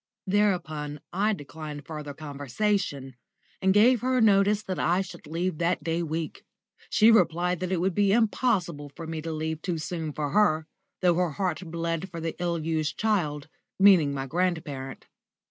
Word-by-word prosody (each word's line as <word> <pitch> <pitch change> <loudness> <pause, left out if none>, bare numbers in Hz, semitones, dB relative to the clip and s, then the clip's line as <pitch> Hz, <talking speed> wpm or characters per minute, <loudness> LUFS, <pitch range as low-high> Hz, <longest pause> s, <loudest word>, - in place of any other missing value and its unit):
Thereupon 175 -7 0
I 205 +4 +2
declined 150 -3 -8
further 150 -3 -7
conversation, 145 - -2 0.5
and 190 - +4
gave 225 +4 +5
her 255 0 +1
notice 205 -1 +4
that 185 -2 -4
I 175 +2 +2
should 175 -4 -9
leave 170 +1 -2
that 170 -2 0
day 165 +1 -1
week. 160 -1 -4 0.5
She 220 +2 +6
replied 180 -3 +2
that 185 0 -3
it 185 - +1
would 185 +2 +1
be 200 +1 +3
impossible 200 - +1
for 165 - -7
me 160 -1 -4
to 165 +1 -4
leave 160 0 -3
too 175 -1 -2
soon 160 0 -4
for 145 -1 -3
her, 160 -5 +3 0.4
though 180 -1 +5
her 175 -2 0
heart 185 -1 -1
bled 165 +2 -3
for 170 -2 -7
the 165 0 -3
ill 175 -1 0
used 155 -1 -2
child, 155 -10 0 0.3
meaning 190 -7 +6
my 135 -1 -3
grandparent. 155 -4 -2
170 Hz, 165 wpm, -27 LUFS, 155-195 Hz, 0.5 s, She